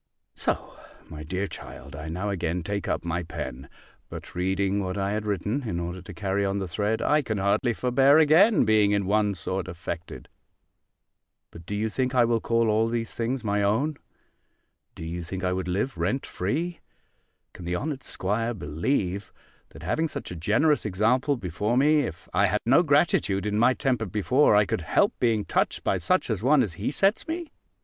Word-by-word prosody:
So, - - -3 0.3
my 75 - -8
dear 90 +6 -2
child, 70 -6 -10
I 80 +2 -6
now 95 +5 -2
again 85 -2 -2
take 100 +3 -3
up - - -2
my 85 +1 -1
pen: 75 -6 -7 0.4
but - - -9
reading 95 +2 0
what 95 +1 -3
I 100 0 -1
had 105 0 -2
written, 105 +7 -1
in 85 - -2
order 90 +1 -5
to 90 - -10
carry 100 -1 -1
on 100 0 0
the 95 -2 -3
thread, 105 +6 -1
I 150 +1 +3
can 110 -6 -3
hardly 100 +6 +1
forbear 135 +5 +4
again 160 - +5
being 110 -2 +4
in 100 -1 +1
one 105 0 +1
sort 95 +1 -3
affected. 85 -1 -7 1.2
But 85 0 -13
do 105 - -3
you 110 +2 0
think 130 +3 -1
I 120 -2 +5
will 115 -1 +1
call 115 0 +1
all 110 +1 +2
these 115 -1 -3
things 120 +2 -2
my 105 -1 0
own? 120 +10 +1 1.0
Do - - -8
you 85 +2 -4
think 95 +3 -6
I 90 0 +1
would 95 0 -3
live 100 +9 -1
rent 130 - -1
free? 165 - -3 0.7
Can 90 - -10
the 90 +1 -1
honoured 140 - -3
'squire 115 +4 -2
believe, 90 - -2 0.4
that - - -13
having 160 +1 0
such - - -7
a - - -5
generous 110 - +2
example 115 +8 +1
before 105 +4 -1
me, 150 +3 +4
if 115 - -4
I 100 +3 +4
had 105 +3 0
no 135 +8 +5
gratitude 140 - +2
in 105 0 0
my 125 +2 +4
temper 125 -5 0
before, 110 +6 +3
I 105 0 +5
could - - -2
help - - +2
being 115 -4 +1
touched - - 0
by - - +1
such - - +1
an - - 0
one 135 +3 +4
as 100 -7 -4
he 100 +6 -3
sets 195 - +1
me? 330 0 -4
105 Hz, 190 wpm, -26 LUFS, 90-125 Hz, 1.2 s, again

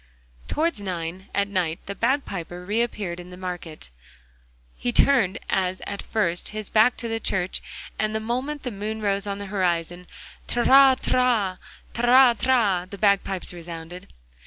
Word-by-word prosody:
Towards 325 -7 -1
nine 180 -1 -5
at 200 0 0
night 180 -5 -2
the 200 - -4
bagpiper 195 - -2
re 210 +4 +1
appeared 200 -7 -3
on 175 0 -10
the 180 - -10
market 180 -4 -6
place. 60 - -11 0.8
He 245 - -2
turned, 235 -6 +3
as 185 -1 0
at 200 0 -5
first, 175 -6 -1
his 215 -1 -1
back 220 +3 +4
to 235 - -3
the 225 0 -2
church, 185 -4 -1 0.4
and 215 0 0
the - - +1
moment 255 +6 -3
the 250 - -3
moon 215 +2 -5
rose 200 0 0
on 200 0 -2
the 200 - -6
horizon, 175 -2 -1 0.4
'Trarira, 250 -5 +4 0.3
trari!' 240 -6 +4
the 200 - -8
bagpipes 195 -2 +1
resounded. 170 +1 -9
200 Hz, 150 wpm, -24 LUFS, 180-235 Hz, 0.8 s, back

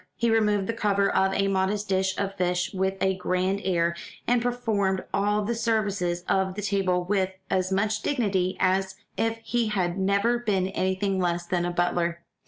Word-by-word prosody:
He 235 -1 +1
removed 210 -3 +2
the 230 - -2
cover 200 -3 +1
of 190 0 +3
a 195 - +2
modest 195 +2 0
dish 190 0 0
of 195 -1 -2
fish 180 -1 -1
with 190 0 0
a 190 0 +2
grand 185 +2 0
air, 170 -2 +1 0.3
and 245 0 +2
performed 220 -6 0
all 205 +1 +1
the 225 +4 -1
services 205 -7 0
of 190 -1 +1
the 210 - -4
table 190 -2 +1
with 190 0 +1 0.2
as 185 0 +1
much 210 +2 +1
dignity 195 -9 0
as 190 0 +1 0.2
if 225 0 0
he 235 0 0
had 185 -3 -1
never 200 +5 +2
been 195 -5 0
anything 190 +1 0
less 175 -1 0
than 175 0 0
a 175 - -1
butler. 175 -1 0
195 Hz, 180 wpm, -26 LUFS, 185-210 Hz, 0.3 s, of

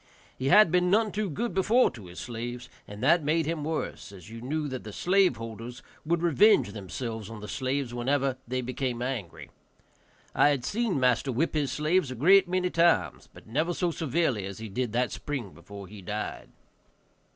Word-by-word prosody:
He 130 - -3
had 195 +4 +7
been 180 0 +3
none 215 +2 +3
too 210 -1 -2
good 230 +10 -3
before 220 +7 +3
to 110 -7 -11
his 90 - -10
slaves, 120 +1 -6 0.2
and 105 +3 -9
that 170 +4 +4
made 160 +2 +1
him 160 -1 -2
worse, 155 -8 -4
as 95 +1 -12
you 115 0 -8
knew 150 +4 -2
that 130 -2 -5
the 105 - -8
slave 185 - +2
holders 115 +2 -8 0.2
would 170 +1 +1
revenge 200 +6 +4
themselves 110 +2 -6
on 115 -1 -8
the 105 - -8
slaves 130 -1 -2
whenever 130 +2 0
they 130 +1 -1
became 125 -1 -3
angry. 120 -9 -5 0.8
I - - +5
had 135 -4 0
seen 215 - 0
master 125 +1 +2
whip 140 +8 0
his 145 -4 0
slaves 155 +1 +1
a 130 - -5
great 185 +8 +5
many 180 0 0
times, 170 0 +2
but - - -15
never 155 +9 -1
so 175 -2 0
severely 155 - 0
as 100 -1 -7
he 110 0 -7
did 120 +3 -2
that 125 +1 +1
spring 130 -10 -5
before 100 +3 -11
he 100 +1 -11
died. 105 +3 -5
130 Hz, 190 wpm, -28 LUFS, 115-170 Hz, 0.8 s, had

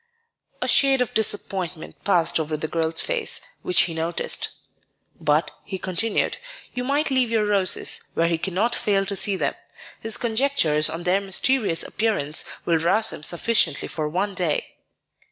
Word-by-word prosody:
A - - -2
shade 270 -1 +4
of 250 - -1
disappointment 190 -6 -2
passed 170 -5 +2
over 155 -1 -2
the 155 - -4
girl's 165 0 +1
face, - - 0 0.2
which 180 - +2
he 170 - -3
noticed. 165 +1 0 0.7
"But," 150 +2 +1
he 190 - -6
continued, 190 +4 -1 0.3
"you 250 - -3
might 285 +3 0
leave 260 -3 +2
your 225 -2 +1
roses 200 -3 +2
where 165 - +2
he 165 -1 0
cannot 195 +7 -1
fail 195 -2 0
to 200 - -2
see 195 +1 +2
them. - - -1 0.5
His 225 0 0
conjectures 225 - +2
on 165 +2 -6
their 185 +3 +1
mysterious 200 -1 +2
appearance 200 -9 -1 0.2
will 165 -2 +2
rouse 215 +7 +3
him - - -8
sufficiently 180 +8 +2
for 155 -2 -3
one 195 +5 -2
day." 175 -5 -2
190 Hz, 155 wpm, -23 LUFS, 165-225 Hz, 0.7 s, shade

